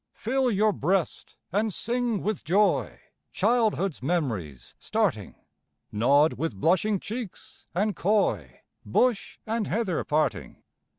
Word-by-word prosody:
Fill 260 Hz, +3 st, 0 dB
your 215 Hz, -1 st, +2 dB
breast 190 Hz, -2 st, -1 dB, 0.2 s
and 210 Hz, +4 st, 0 dB
sing 235 Hz, 0 st, -1 dB
with 215 Hz, -1 st, -2 dB
joy! 200 Hz, +5 st, +1 dB, 0.3 s
Childhood's 215 Hz, -8 st, +1 dB
mem'ries 120 Hz, -, -3 dB
starting, -, -, -1 dB, 0.6 s
Nod 140 Hz, +8 st, +3 dB
with 165 Hz, -9 st, -2 dB
blushing 190 Hz, -, +2 dB
cheeks 220 Hz, 0 st, -8 dB
and 205 Hz, +3 st, 0 dB
coy, 115 Hz, -, 0 dB, 0.2 s
Bush 225 Hz, -, 0 dB
and 225 Hz, -1 st, -1 dB
heather 200 Hz, -5 st, -1 dB
parting. 155 Hz, +1 st, -1 dB
195 Hz, 110 wpm, -26 LUFS, 155-220 Hz, 0.6 s, Nod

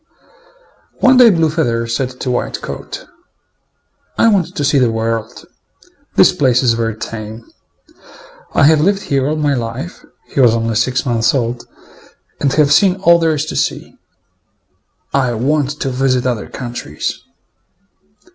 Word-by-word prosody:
One 255 Hz, 0 st, +5 dB
day 245 Hz, -2 st, +8 dB
Blue 165 Hz, -5 st, +2 dB
feather 120 Hz, -8 st, -1 dB
said 125 Hz, +2 st, -3 dB
to 125 Hz, -, -2 dB
White 120 Hz, -, -2 dB
coat, -, -, -7 dB, 1.1 s
"I 230 Hz, -, +4 dB
want 195 Hz, -6 st, 0 dB
to 145 Hz, -, -1 dB
see 140 Hz, 0 st, +3 dB
the 125 Hz, -3 st, +2 dB
world. 115 Hz, +1 st, -3 dB, 0.7 s
This 185 Hz, -, +5 dB
place 130 Hz, -7 st, +2 dB
is 120 Hz, -2 st, +3 dB
very 115 Hz, -1 st, -2 dB
tame. 110 Hz, 0 st, -7 dB, 1.1 s
I -, -, +4 dB
have 155 Hz, +1 st, +5 dB
lived 200 Hz, +4 st, +1 dB
here 135 Hz, 0 st, 0 dB
all 155 Hz, -, -1 dB
my 150 Hz, -2 st, 0 dB
life 115 Hz, -6 st, -5 dB, 0.2 s
(he -, -, -5 dB
was 120 Hz, -3 st, +5 dB
only 115 Hz, 0 st, -1 dB
six 125 Hz, +5 st, 0 dB
months 115 Hz, 0 st, +1 dB
old) 120 Hz, -2 st, -2 dB, 0.7 s
and 140 Hz, -, +1 dB
have 145 Hz, -2 st, +3 dB
seen 185 Hz, +3 st, +4 dB
all 170 Hz, -3 st, +4 dB
there 165 Hz, -2 st, +1 dB
is 150 Hz, +1 st, -2 dB
to -, -, -6 dB
see. -, -, -2 dB, 1.2 s
I 130 Hz, -3 st, +1 dB
want 145 Hz, +4 st, -1 dB
to 135 Hz, -, -1 dB
visit 130 Hz, -1 st, 0 dB
other 120 Hz, -5 st, -2 dB
countries." 120 Hz, -, -5 dB
130 Hz, 150 wpm, -16 LUFS, 115-150 Hz, 1.2 s, day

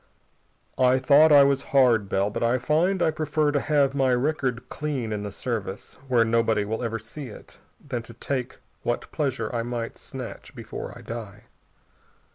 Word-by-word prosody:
"I 130 Hz, 0 st, +5 dB
thought 145 Hz, +4 st, +6 dB
I 145 Hz, -1 st, +9 dB
was 140 Hz, -1 st, +2 dB, 0.2 s
hard, 115 Hz, -7 st, +4 dB
Bell, 100 Hz, +1 st, +1 dB
but -, -, -4 dB
I 120 Hz, +2 st, +3 dB
find 165 Hz, +8 st, +1 dB
I 160 Hz, -, +3 dB
prefer 155 Hz, -1 st, 0 dB
to 145 Hz, -, +1 dB
have 140 Hz, -2 st, +2 dB
my 135 Hz, -2 st, +2 dB
record 130 Hz, -2 st, -1 dB
clean 135 Hz, -7 st, -3 dB
in 105 Hz, -, -3 dB
the 105 Hz, 0 st, -5 dB
Service 105 Hz, -3 st, -4 dB
where 120 Hz, -3 st, +4 dB
nobody 115 Hz, -2 st, +2 dB
will 110 Hz, +3 st, -3 dB
ever 115 Hz, -2 st, -2 dB
see 115 Hz, +6 st, -8 dB
it 105 Hz, -, -13 dB, 0.2 s
than 125 Hz, -4 st, -4 dB
to 115 Hz, +1 st, -12 dB
take 130 Hz, 0 st, -3 dB, 0.2 s
what 120 Hz, -, -3 dB
pleasure 130 Hz, -6 st, -2 dB
I 120 Hz, -, 0 dB
might 120 Hz, 0 st, -4 dB
snatch -, -, -8 dB
before -, -, -7 dB
I -, -, -11 dB
die. 105 Hz, -3 st, -7 dB
125 Hz, 175 wpm, -25 LUFS, 115-140 Hz, 0.2 s, I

